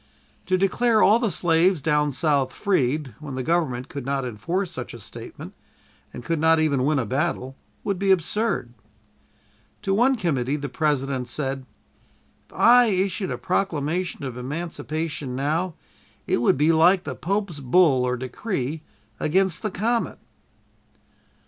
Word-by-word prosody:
To 185 - +2
declare 215 +4 +3
all 215 +4 +6
the 235 -3 +1
slaves 175 +1 +2
down 150 +1 +1
South 140 -1 +1
freed, 150 - 0
when 150 -3 -7
the 130 - -3
Government 135 -6 0
could 140 - -6
not 135 0 -1
enforce 165 - -3
such 125 -7 -7
a - - -10
statement 100 - -9 0.6
and 120 - -9
could 165 -2 -1
not 160 +1 +4
even 140 -5 +1
win 150 +1 +2
a 130 - 0
battle, 135 +1 -2 0.3
would 200 -3 -2
be 195 0 0
absurd. 190 - +1 1.1
To 195 -2 0
one 250 +6 +4
committee 145 - -1
the 145 -1 -4
President 135 -4 -1
said: 135 0 -4 0.8
"If - - -18
I 245 +1 +6
issued 190 -2 0
a - - -3
proclamation 175 -2 -1
of 130 -3 -5
emancipation 150 0 -4
now 155 +6 -1 0.5
it - - +1
would 120 +2 +3
be 150 +3 +4
like 175 +3 +4
the - - -4
Pope's 195 -3 -2
bull 135 -1 +4
(or 125 0 0
decree) 140 - -3 0.4
against 185 +2 +1
the 215 - -1
comet!" 230 +5 -1
155 Hz, 150 wpm, -24 LUFS, 135-185 Hz, 1.1 s, all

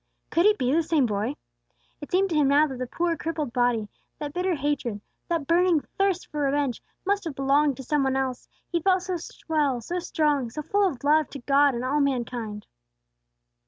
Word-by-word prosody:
Could 340 +4 +4
he 425 - +6
be 255 0 0
the 330 - +4
same 315 -4 +2
boy? 215 +5 -1 0.7
It 290 - -8
seemed 385 +1 +2
to - - 0
him 295 -2 +4
now 285 +2 +5
that 265 -4 -6
that 255 -1 -4
poor, 340 +3 0
crippled 310 -6 -3
body, 245 -4 +1 0.3
that 295 -2 -5
bitter 360 0 0
hatred, 275 -7 -2 0.3
that 335 -4 -1
burning 340 0 +3 0.2
thirst 390 -2 +1
for 300 - -4
revenge, 280 -3 0 0.2
must 405 +1 +1
have 315 -4 -4
belonged 275 +1 +2
to 265 - -7
some 295 +3 +1
one 265 0 +1
else, 260 -2 -2 0.2
he 340 -1 0
felt 370 +1 +2
so 365 -1 -2 0.3
well, 295 -6 +1
so 345 +10 -3
strong, 300 -7 0
so 305 +6 -6
full 405 +5 +2
of 265 -6 -9
love 305 +1 +3
to 280 - -8
God 280 +1 +3
and 240 +2 -3
all 285 +3 +1
mankind. 240 -6 -2
290 Hz, 200 wpm, -26 LUFS, 260-335 Hz, 0.7 s, he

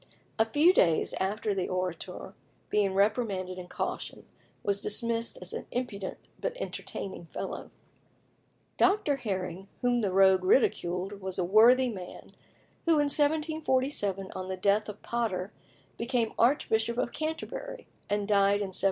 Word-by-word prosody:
A 225 - +5
few 295 +10 +4
days 165 - +3
after 205 +2 -1
the 190 -2 -2
Orator, 185 0 -4 0.4
being 200 -2 +2
reprimanded 195 -3 0
and 180 0 -9
cautioned, - - -4 0.4
was 200 0 0
dismissed 230 +2 -1
as 180 - -6
an - - -5
impudent 210 -6 -4 0.2
but - - -3
entertaining 190 - -6
fellow. - - -6 1.1
Dr. 385 -8 +3
Herring 190 -5 -4
whom 245 -1 +2
the 200 -3 0
rogue 190 0 +5
ridiculed 185 -2 +1
was 190 -1 -5
a 185 - +1
worthy 235 +7 +6
man, 185 -5 -8 0.6
who 335 - +4
in 290 -2 +3
1747, 285 - +1
on 185 0 -4
the 190 0 -4
death 200 +3 +2
of 210 - -9
Potter, 210 -5 -2 0.5
became 235 -1 0
Archbishop 235 -2 +2
of 240 - 0
Canterbury, - - -5 0.2
and 205 0 0
died 200 -1 +4
in 195 -2 -4
1757. - - +3
210 Hz, 140 wpm, -29 LUFS, 190-250 Hz, 1.1 s, worthy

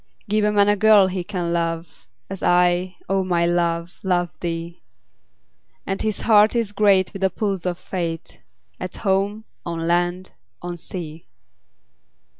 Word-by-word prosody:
Give 210 +1 +1
a 210 - +3
man 205 -1 +4
a 205 - +4
girl 210 -1 +6
he 185 -1 -2
can 175 -2 -3
love, 165 -1 -3 0.2
As 195 -1 -7
I, 180 +1 +2
O 195 0 +1
my 175 -2 +1
love, 170 0 -1
love 175 -2 0
thee; 170 0 -5 1.0
10 - - -4
And 195 - -2
his 215 -2 -2
heart 215 0 +5
is 230 -3 0
great 200 -2 +3
with 195 - -7
the 190 - +3
pulse 195 -2 -2
of 175 -1 -2
Fate, 170 -3 -5 0.4
At - - -5
home, 200 +2 0 0.2
on 165 -1 -4
land, 175 +2 0 0.3
on 175 0 -4
sea. 165 -3 -7
180 Hz, 155 wpm, -22 LUFS, 170-200 Hz, 1.0 s, girl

